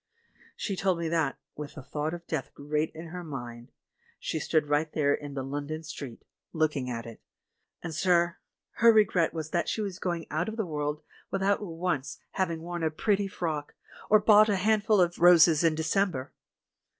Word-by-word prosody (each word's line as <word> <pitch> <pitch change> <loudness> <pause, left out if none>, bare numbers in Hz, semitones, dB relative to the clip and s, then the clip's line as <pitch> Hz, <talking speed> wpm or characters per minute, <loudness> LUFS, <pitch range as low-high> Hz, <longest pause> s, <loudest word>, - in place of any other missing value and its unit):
She 200 - -3
told 190 -1 +1
me 170 -1 -2
that 160 -4 0
— - - -59
with 150 -1 -7
the 145 - -8
thought 150 +4 -3
of 170 0 -11
death 135 - -4
great 150 +2 -1
in 165 +1 -8
her 180 +1 -6
mind 120 -6 -8 0.3
— - - -36
she 160 - -1
stood 155 0 +1
right 150 +2 +1
there 145 -2 +2
in 145 -1 -5
the 135 - -2
London 145 +4 -4
street, 140 -6 -8 0.3
looking 150 -5 0
at 115 -1 -4
it; 115 -1 -10 0.6
and, 165 -2 -4
sir, 170 +1 +2 0.4
her 230 +1 +7
regret 195 -6 +3
was 155 -2 -5
that 175 - 0
she - - -2
was 195 -4 -3
going 170 -3 -2
out 155 +8 -1
of 220 - -7
the 220 - 0
world 150 -1 -3 0.3
without 195 +1 +1
once 165 -6 -3
hav 190 -2 0
ing 165 -1 -4
worn 175 0 -4
a 160 - +2
pretty 200 +5 0
frock, 160 -6 -4 0.3
or 215 - +7
bought 210 0 +6
a 205 - +3
handful 215 +2 +3
of 175 -1 +2
roses 170 -2 +7
in 165 -2 +3
December! 160 -4 0
165 Hz, 195 wpm, -28 LUFS, 150-185 Hz, 0.6 s, her